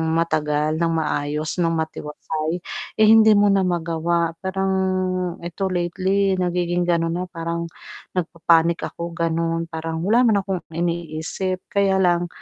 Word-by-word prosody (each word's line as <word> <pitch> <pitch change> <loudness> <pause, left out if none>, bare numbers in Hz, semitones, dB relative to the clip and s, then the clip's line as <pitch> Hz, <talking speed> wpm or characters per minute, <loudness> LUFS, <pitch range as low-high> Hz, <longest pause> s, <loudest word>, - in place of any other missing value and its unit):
matagal, 155 -2 0
ng 165 0 +1
maayos, 150 +1 -2
ng 165 -1 +2
matiwasay, 160 +1 -3 0.4
eh, 215 - +6
hindi 220 -1 +7
mo 205 0 +4
na 195 -1 +3
magawa 170 -1 0
parang, 190 +1 -1 0.7
'eto 175 +3 -3
lately 190 +2 +1
nagiging 175 -1 0
ganon 165 -1 +1
na 180 - -2
parang, 170 0 -4 0.5
nagpapanic 170 -1 +2 0.2
ako 170 0 -5
ganon, 165 0 0
parang 160 0 -4
wala 235 +4 +4
naman 220 -4 +4
akong 190 -3 -2
iniisip 170 +2 -2
kaya 200 -1 +3
lang, 175 -1 +2
170 Hz, 130 wpm, -22 LUFS, 165-185 Hz, 0.7 s, hindi